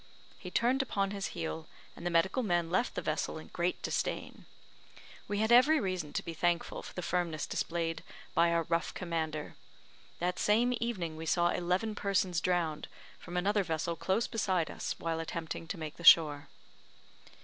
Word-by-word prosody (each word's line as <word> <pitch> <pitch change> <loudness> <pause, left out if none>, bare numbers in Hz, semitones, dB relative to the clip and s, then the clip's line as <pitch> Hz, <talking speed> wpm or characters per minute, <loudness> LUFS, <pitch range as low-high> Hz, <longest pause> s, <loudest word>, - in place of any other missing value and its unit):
He 180 - -7
turned 245 +7 +2
upon 200 -6 -1
his 200 -1 -3
heel, 160 -1 -4 0.3
and - - -11
the 175 - 0
medical 175 +8 +2
men 175 -6 0
left 190 +7 +1
the - - -3
vessel - - -1
in - - -10
great - - -1
disdain. - - -3 0.8
We 205 - -2
had 220 +2 +1
every 285 +6 +7
reason 185 - -2
to - - -1
be 165 - -4
thankful 170 +1 0
for - - -9
the 180 - -4
firmness 170 -3 -1
displayed 165 -1 -2 0.3
by 170 0 +4
our 170 0 +2
rough 165 0 -1
commander. 160 -4 -3 0.6
That 180 +1 -1
same 240 +4 +3
evening 180 -9 -2
we 160 0 -6
saw 175 +3 +3
eleven 180 +6 0
persons 195 -4 0
drowned, 170 -4 0 0.3
from 175 +1 -6
another 200 +3 +2
vessel 165 0 -2
close 195 +7 0
beside 185 -7 0
us - - -4
while 165 -1 -2
attempting 165 0 -5
to 185 - -4
make 155 -2 -6
the 170 - -10
shore. 150 -4 +7
175 Hz, 170 wpm, -32 LUFS, 165-200 Hz, 0.8 s, every